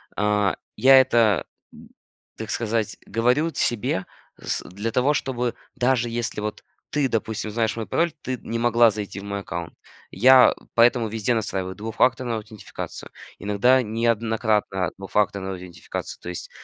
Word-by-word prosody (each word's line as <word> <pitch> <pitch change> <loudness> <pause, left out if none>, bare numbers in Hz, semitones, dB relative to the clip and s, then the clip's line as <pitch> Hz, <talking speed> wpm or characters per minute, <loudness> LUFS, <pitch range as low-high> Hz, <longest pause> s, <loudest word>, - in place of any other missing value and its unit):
а, 105 -1 +1 0.2
я 135 +4 +7
это, 115 -6 +2 0.3
г - - -15 0.6
так 110 -1 -6
сказать, 115 -1 -1
говорю 125 +8 +1
т - - -7
себе 105 -5 0 0.3
с - - -3
для 105 +5 -4
того, 130 +5 +2
чтобы, 125 -3 -2 0.2
даже 125 -1 +1
если 115 -2 -3
вот 105 0 -5 0.3
ты, 145 -2 +1
допустим, 110 -2 -2
знаешь 110 +1 -1
мой 115 - -4
пароль, 170 0 +1
ты 130 -1 -3
не 115 +1 -4
могла 120 -1 +5
зайти 100 -1 -6
в - - -12
мой 100 0 -4
аккаунт. 85 -3 -6 0.4
Я 130 +5 +7 0.2
поэтому 120 0 +4
везде 110 +2 -1
настраиваю 95 -4 -2
двухфакторную 120 +3 0
аутентификацию, 110 -1 -8 0.3
иногда 105 +6 +3
неоднократно 110 -4 0
двухфакторную 95 0 -1
аутентификацию, 90 -2 -7
то - - -10
есть 90 - -6
110 Hz, 145 wpm, -23 LUFS, 105-120 Hz, 0.6 s, я